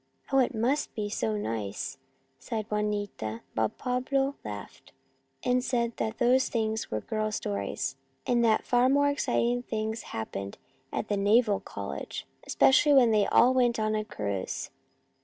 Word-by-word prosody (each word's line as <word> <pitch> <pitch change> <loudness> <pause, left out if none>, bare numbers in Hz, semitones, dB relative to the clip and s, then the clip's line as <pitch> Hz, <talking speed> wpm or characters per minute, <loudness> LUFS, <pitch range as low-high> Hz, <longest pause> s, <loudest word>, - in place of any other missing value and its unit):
" - - -23
Oh, 270 - +6
it 250 -2 +2
must 255 +7 0
be 210 -1 -2
so 110 - -1
nice," 105 +3 -4 0.4
sighed 220 - -4
Juanita, 205 - -2
but 110 -1 -1
Pablo 270 +2 0
laughed, 105 -1 -9 0.5
and 250 0 +2
said 235 -2 0
that 220 0 -2
those 255 +1 +3 0.4
were 110 - -2
girl's 215 - -2
stories, 100 +6 -3 0.3
and 240 -1 +2
that 220 -2 +3
far 245 +1 +3
more 285 +1 +4
exciting 245 -3 +1
things 220 -1 -3
happened 100 -3 -5 0.3
at - - -3
the 205 - 0
naval 205 +1 +3
college, 100 -9 -6 0.2
especially 290 +2 +5
when 250 -4 +6
they 210 -2 +3
all 250 +2 +5
went 245 -2 +3
on 215 0 0
a 215 0 0
cruise. 100 - -4
220 Hz, 150 wpm, -28 LUFS, -, 0.5 s, Oh